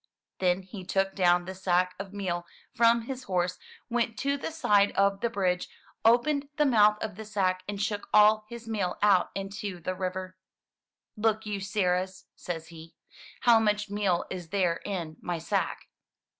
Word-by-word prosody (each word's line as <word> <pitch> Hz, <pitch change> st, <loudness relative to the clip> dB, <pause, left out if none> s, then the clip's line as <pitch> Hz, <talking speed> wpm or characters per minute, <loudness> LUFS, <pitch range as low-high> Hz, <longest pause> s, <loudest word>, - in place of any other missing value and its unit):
Then 185 Hz, 0 st, +1 dB
he 190 Hz, 0 st, -9 dB
took 195 Hz, +1 st, 0 dB
down 175 Hz, -2 st, +3 dB
the 190 Hz, -, -5 dB
sack 180 Hz, -1 st, +1 dB
of 195 Hz, -1 st, -6 dB
meal 175 Hz, -4 st, -3 dB, 0.3 s
from 230 Hz, 0 st, +4 dB
his 255 Hz, +1 st, -6 dB
horse, 180 Hz, -1 st, -1 dB, 0.3 s
went 235 Hz, -2 st, -1 dB
to 280 Hz, +1 st, 0 dB
the 285 Hz, -, -4 dB
side 205 Hz, -11 st, +3 dB
of 200 Hz, 0 st, +2 dB
the 235 Hz, -, +1 dB
bridge, 185 Hz, -5 st, 0 dB, 0.3 s
opened 280 Hz, +5 st, +3 dB
the 300 Hz, -, +3 dB
mouth 210 Hz, -5 st, +5 dB
of 210 Hz, -4 st, -5 dB
the 220 Hz, -, -6 dB
sack, 190 Hz, -3 st, 0 dB
and 205 Hz, -1 st, -4 dB
shook 205 Hz, 0 st, -2 dB
all 215 Hz, 0 st, +5 dB
his 235 Hz, -1 st, -9 dB
meal 200 Hz, -5 st, -2 dB
out 195 Hz, -4 st, +4 dB
into 195 Hz, -1 st, -5 dB
the 185 Hz, +2 st, -3 dB
river. 185 Hz, 0 st, -4 dB, 0.8 s
"Look 220 Hz, 0 st, 0 dB
you, 205 Hz, -1 st, -3 dB
sirrahs," 190 Hz, -2 st, -1 dB
says 165 Hz, -2 st, -6 dB
he. 165 Hz, -1 st, -12 dB, 0.5 s
"How 235 Hz, -2 st, +6 dB
much 210 Hz, -1 st, 0 dB
meal 200 Hz, -4 st, +1 dB
is 180 Hz, -3 st, -6 dB
there 180 Hz, -3 st, +1 dB
in 170 Hz, -6 st, -4 dB
my 175 Hz, -1 st, -2 dB
sack?" 160 Hz, -, -1 dB
195 Hz, 170 wpm, -28 LUFS, 180-215 Hz, 0.8 s, How